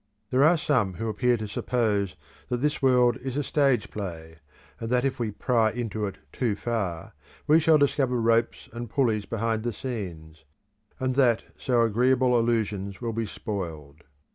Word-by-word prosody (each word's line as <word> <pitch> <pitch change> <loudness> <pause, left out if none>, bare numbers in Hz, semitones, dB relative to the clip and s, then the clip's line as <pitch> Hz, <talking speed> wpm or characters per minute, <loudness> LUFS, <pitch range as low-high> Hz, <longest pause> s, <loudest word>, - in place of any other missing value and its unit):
There 130 +2 +4
are 165 +3 +5
some 120 - +1
who 115 +6 -3
appear 120 +3 +1
to 110 -1 -5
suppose 105 -3 -1 0.3
that 125 - 0
this 145 +4 -1
world 125 -2 +4
is 130 +1 -5
a 145 - 0
stage 135 -6 +1
play, 80 -5 -7 0.4
and 115 - -4
that 125 +1 +2
if 135 -1 -1
we 115 -2 -1
pry 115 +1 +1
into 110 -2 -3
it 100 - -7 0.2
too 115 -5 0
far, 100 -8 -3 0.3
we 155 +2 +5
shall 160 -1 +5
discover 135 -3 +1
ropes 115 0 +1
and 120 -1 -6
pulleys 110 -6 +1
behind 115 0 -1
the 120 +1 -2
scenes, 90 -10 -7 0.6
and 130 0 0
that 120 -5 +3
so 120 -2 +1
agreeable 125 +3 +3
illusions 105 -4 -1
will 115 -2 -3
be 115 0 -2
spoiled. 80 -9 -6
115 Hz, 165 wpm, -26 LUFS, 105-125 Hz, 0.6 s, are